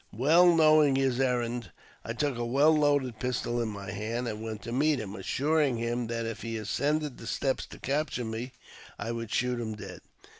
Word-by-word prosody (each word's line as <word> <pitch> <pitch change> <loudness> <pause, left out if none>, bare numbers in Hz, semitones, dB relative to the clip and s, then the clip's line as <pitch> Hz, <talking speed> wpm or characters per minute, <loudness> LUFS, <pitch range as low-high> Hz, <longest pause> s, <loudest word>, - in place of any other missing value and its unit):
Well 165 +9 +5
knowing 155 -3 +5
his 135 -2 +1
errand, 120 -4 0 0.3
I 115 - -4
took 145 +2 -1
a 120 - -3
well 140 +6 +4
loaded 145 -6 +1
pistol 120 -1 -1
in 115 - -1
my 100 -2 -6
hand, 115 +5 -3
and 110 -1 -4
went 110 -2 -6
to 115 - -6
meet 145 +3 +2
him, 100 -3 -6
assuring 140 +6 +1
him 120 +1 -2
that 115 0 -3
if 115 -1 -5
he 115 0 -4
ascended 140 +7 -1
the 115 - -9
steps 135 +2 -1
to - - -11
capture 140 -3 -1
me 110 +3 -4 0.5
I 115 - -4
would 115 -1 -5
shoot 125 -1 0
him 110 -2 -4
dead. 105 - -9
120 Hz, 195 wpm, -29 LUFS, 115-140 Hz, 0.5 s, Well